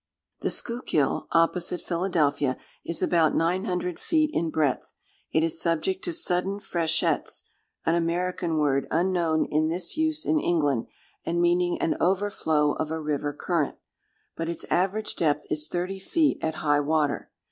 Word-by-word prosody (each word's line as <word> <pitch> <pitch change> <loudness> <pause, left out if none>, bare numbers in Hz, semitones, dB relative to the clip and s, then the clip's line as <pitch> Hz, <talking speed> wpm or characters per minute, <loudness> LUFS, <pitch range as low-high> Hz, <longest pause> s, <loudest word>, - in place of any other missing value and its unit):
The - - -1
Schuylkill 235 - 0
opposite 170 +1 +2
Philadelphia, 155 -7 0 0.3
is 170 - -1
about 165 -3 +3
nine 180 +4 +1
hundred 180 -3 -2
feet 310 -2 +1
in 165 - 0
breadth. 150 -5 0 0.4
It 160 - +2
is 165 0 0
subject 180 - 0
to 350 - -1
sudden 195 - +1
freshets, 170 -6 0 0.4
(an 165 - +3
American 170 0 0
word, 140 -3 +1
unknown 170 -2 +1
in 155 +1 +1
this 170 - -1
use 315 -1 0
in 315 - +2
England, 145 - +1 0.4
and 170 +1 -1
meaning 175 0 +2
an - - 0
overflow 175 -5 +2
of 150 - -3
a 160 0 -2
river 150 -1 -1
current,) 150 0 -1 0.6
but 165 0 -3
its 170 - -3
average 195 +4 +1
depth 150 -3 +1
is 150 0 0
thirty 180 +3 -3
feet 305 - +1
at 160 0 -1
high 145 -1 +4
water. 150 0 0
170 Hz, 150 wpm, -26 LUFS, 155-185 Hz, 0.6 s, high